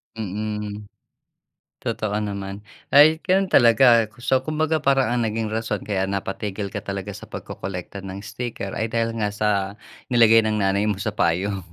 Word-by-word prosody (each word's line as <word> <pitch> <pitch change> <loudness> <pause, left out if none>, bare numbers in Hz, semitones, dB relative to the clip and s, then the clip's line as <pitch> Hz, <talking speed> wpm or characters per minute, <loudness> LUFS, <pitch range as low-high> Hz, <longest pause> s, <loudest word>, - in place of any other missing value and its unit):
Mm. 105 0 -4 1.0
Totoo 105 -1 -2
naman. 100 0 -5 0.3
Ay, 155 +3 +7
gano’n 190 0 +2
talaga, 115 -1 +6 0.2
so 130 0 +3
kumbaga 155 +3 0
parang 135 -4 +2
ang 120 - +1
naging 110 0 -2
rason 110 -2 -2
kaya 95 -2 -1
napatigil 100 +1 -4
ka 105 - -4
talaga 100 0 -5
sa 100 - -9
pagkokolekta 95 +1 -7
ng 95 +1 -7
sticker 105 -1 -5
ay 110 - -2
dahil 115 0 -1
nga 105 -2 +1
sa 105 0 0 0.6
nilagay 115 -3 +5
ng 105 -1 0
nanay 100 +2 +1
mo 105 - +1
sa - - -1
payong 95 +2 -1
105 Hz, 155 wpm, -23 LUFS, 100-115 Hz, 1.0 s, Ay